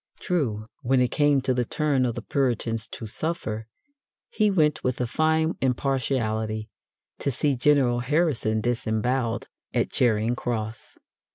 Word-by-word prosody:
True, 120 -12 -1 0.2
when 130 0 +2
it 125 -1 +2
came 145 -2 +3
to 130 0 +1
the 125 0 +1
turn 135 0 +1
of 120 - -3
the - - -5
Puritans 120 -4 -1
to 115 - -8
suffer, 110 -3 -3 0.6
he 215 -1 +2
went, 155 -6 +2
with 125 -1 -1
a 125 - +1
fine 160 +5 +1
impartiality, 115 -5 -1 0.5
to - - -1
see 140 +2 +1
General 130 -2 +3
Harrison 125 -5 +1
disembowelled 120 +1 -1 0.3
at - - +1
Charing 115 -1 +2
Cross. 110 -2 -4
125 Hz, 140 wpm, -25 LUFS, 115-145 Hz, 0.6 s, came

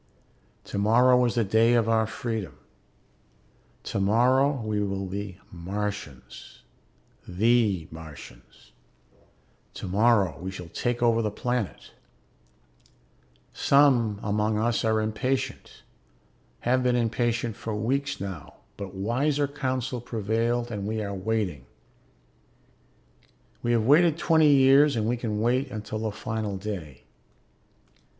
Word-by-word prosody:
Tomorrow 125 +5 +3
is 120 - -1
the 115 - +2
day 110 +4 +3
of 115 -2 +2
our 110 -1 +2
freedom. 110 - -5 1.3
Tomorrow 125 +8 +2
we 110 -1 -1
will 100 -1 -2
be 100 0 -6
Martians, 95 -5 -6 0.6
the 100 -3 +2
Martians. 80 -3 -13 1.0
Tomorrow 100 -1 +2
we 90 +2 -5
shall 90 -3 -8
take 120 +6 -2
over 115 -1 +3
the 110 - 0
planet. 120 0 -3 1.6
Some 125 -7 +3
among 105 +1 0
us 115 +2 0
are 110 -1 +2
impatient, 125 +4 -3 0.8
have 130 +2 +2
been 125 -1 +2
impatient 120 -1 0
for 110 -2 -5
weeks 135 +6 -1
now, 95 -6 -7 0.2
but 100 -1 -7
wiser 140 +9 0
counsel 130 -3 -3
prevailed 115 +2 -1
and 100 -2 -4
we 110 0 -2
are 100 -1 -4
waiting. 95 - -2 1.9
We 120 - 0
have 115 -2 +1
waited 155 +4 +5
twenty 160 -3 +4
years 140 +1 +5
and 110 -2 0
we 120 - +1
can 110 -3 -3
wait 130 +4 +1
until 110 -1 -5
the 110 -1 -2
final 110 -1 -4
day. 90 -10 -7
110 Hz, 115 wpm, -26 LUFS, 100-125 Hz, 1.9 s, waited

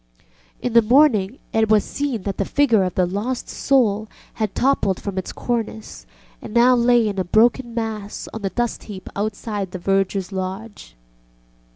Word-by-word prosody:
In 245 - -1
the 235 - +7
morning 240 -3 +3 0.2
it 220 -1 +2
was 215 -2 +4
seen 275 -8 -3
that 200 -2 -3
the - - +2
Figure 235 -2 +3
of 180 -1 -3
the 185 - +3
Lost 210 +8 -3
Soul 220 -6 +1 0.3
had 215 -3 -3
toppled 255 -8 +1
from 200 -2 -5
its 185 - -6
cornice 225 -2 -4 0.3
and 215 - -9
lay 240 0 +5
now 215 - 0
in 195 - -5
a - - +1
broken 230 +5 +2
mass 220 -3 -4
on 220 - -6
the 195 - -1
dust 240 +3 -3
heap 195 -3 -9
outside 205 -1 -3
the 185 - -6
vergerŌĆÖs 195 +1 0
lodge. 190 - -6
215 Hz, 170 wpm, -21 LUFS, 195-240 Hz, 0.3 s, the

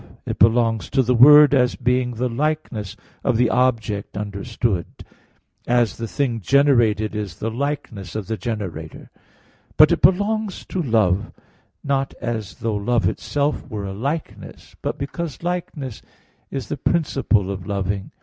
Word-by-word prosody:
It - - -4
belongs 115 -4 +3
to 135 -1 +2
the 125 +1 +2
word 145 +4 +8
as 125 -3 +3
being 125 0 0
the 125 +3 -1
likeness 120 -6 -3 0.3
of 125 -4 +1
the 120 -1 +3
object 115 -6 0
understood, 105 -1 -2 0.8
as 120 -4 +2
the 115 - -4
thing 120 -1 -1
generated 115 -4 +3
is 105 -5 -4
the 115 +5 -4
likeness 115 - -4
of 110 -2 -3
the 110 - -3
generator; 95 -7 -6 0.7
but - - +8
it - - +1
belongs 205 +2 +1
to 185 - -2
love, 110 - +1 0.5
not 135 -1 -1
as 115 -4 -4
though 115 -2 -1
love 115 +3 +1
itself 145 +1 -2
were 105 -2 -4
a 95 - -5
likeness, 140 +10 -5
but - - -3
because 155 +3 -5
likeness 165 -8 -4 0.5
is 135 -2 -5
the 145 - -3
principle 135 - +1
of 95 -1 -6
loving. 100 -1 -2
120 Hz, 145 wpm, -21 LUFS, 105-140 Hz, 0.8 s, word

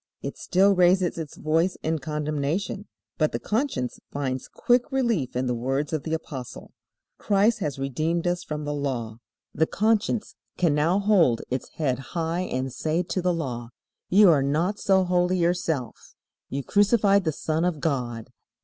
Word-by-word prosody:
It - - -4
still 195 +2 +3
raises 180 -1 +3
its 155 -3 -7
voice 165 +4 +1
in 160 0 0
condemnation. 150 +6 -2 0.3
But 155 -1 +2
the - - -1
conscience 215 - -2
finds 130 -2 -3
quick 245 +3 +1
relief 230 - 0
in 125 +1 0
the 125 - 0
words 135 +5 -2
of 155 - 0
the 160 +2 -2
Apostle: 135 -6 -8 0.5
"Christ 210 +3 +2
has 150 -8 -3
redeemed 155 +6 -1
us 175 0 0
from 150 -1 -5
the 145 - -2
law." 125 -6 -3 0.4
The 160 - +2
conscience 220 +1 0 0.2
can 170 -4 +2
now 155 +5 +2
hold 195 - +3
its 130 - -3
head 130 -6 0 0.2
high 165 +1 -1
and 130 -7 -3
say 160 +6 -1
to 185 +1 -2
the 180 0 +2
Law: 125 -8 -4 0.4
"You 200 +1 +7
are 145 -4 +3
not 160 +9 0
so 190 -1 +3
holy 180 0 +1
yourself. 165 -8 -2 0.3
You 140 +1 -3
crucified 205 - +3
the 160 - 0
Son 155 +2 -2
of 175 -4 0
God. 125 -7 -2
160 Hz, 165 wpm, -25 LUFS, 140-185 Hz, 0.5 s, You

